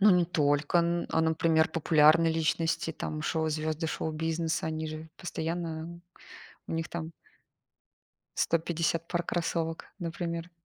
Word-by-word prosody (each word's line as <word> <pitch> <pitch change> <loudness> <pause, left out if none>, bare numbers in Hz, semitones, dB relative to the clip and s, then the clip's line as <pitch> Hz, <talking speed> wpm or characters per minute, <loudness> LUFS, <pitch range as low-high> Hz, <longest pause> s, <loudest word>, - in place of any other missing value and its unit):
Ну, 205 +1 +7
не 180 -1 +5
только, 145 -1 +2
н 170 0 +1
а, 160 - +2
например, 160 0 +3
популярные 160 0 +5
личности, 160 0 0
там, 155 0 -4
шоу 160 0 0
звезды 155 +1 -1
шоу-бизнеса, 160 +1 -1
они 160 0 -2
же 155 +1 -7
постоянно, 165 -1 -4 0.7
у - - -3
них 165 0 -2
там 165 -1 -5 1.2
150 165 0 0
пар 175 -1 0
кроссовок, 165 -1 -2
например. 170 0 -4
165 Hz, 125 wpm, -29 LUFS, 160-170 Hz, 1.2 s, Ну